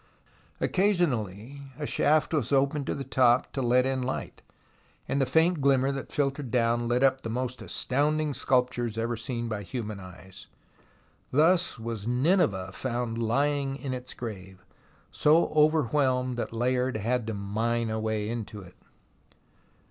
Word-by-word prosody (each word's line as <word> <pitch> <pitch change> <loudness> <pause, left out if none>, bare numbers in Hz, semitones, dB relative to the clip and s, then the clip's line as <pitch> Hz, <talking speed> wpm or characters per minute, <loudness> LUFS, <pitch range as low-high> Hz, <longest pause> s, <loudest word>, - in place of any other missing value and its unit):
Occasionally 140 - 0 0.2
a 150 - -4
shaft 155 +3 +2
was 140 -5 0
opened 140 +1 +1
to - - -1
the 140 - -4
top 130 -1 +2
to 135 - -2
let 125 +1 +3
in 130 -1 0
light, 125 +1 -4 0.7
and 140 - 0
the 135 - +2
faint 165 0 +3
glimmer 135 -1 +3
that 135 -1 -6
filtered 140 -2 -1
down 120 0 +1
lit 120 +2 +1
up 135 -1 +3
the 115 - -5
most 125 +2 -3
astound 145 +4 0
ing 155 -2 -1
sculptures 125 -4 0
ever 115 +1 -1
seen 120 +1 -4
by 110 -2 -3
human 105 -1 -5
eyes. 95 0 -12 0.8
Thus 165 +3 +3
was 110 -2 -5
Nineveh 125 - +1
found 120 -2 -3
lying 140 +4 0
in 135 -2 -5
its 125 0 -6
grave, 95 -5 -8 0.5
so 155 +3 +3
overwhelmed 145 -4 +2
that 120 - -3
Layard 125 +1 0
had 115 +2 -1
to 110 - -3
mine 110 +3 -1
a 110 - -2
way 110 -1 -2
into 110 -2 -5
it. 90 -2 -15
125 Hz, 150 wpm, -27 LUFS, 115-140 Hz, 0.8 s, let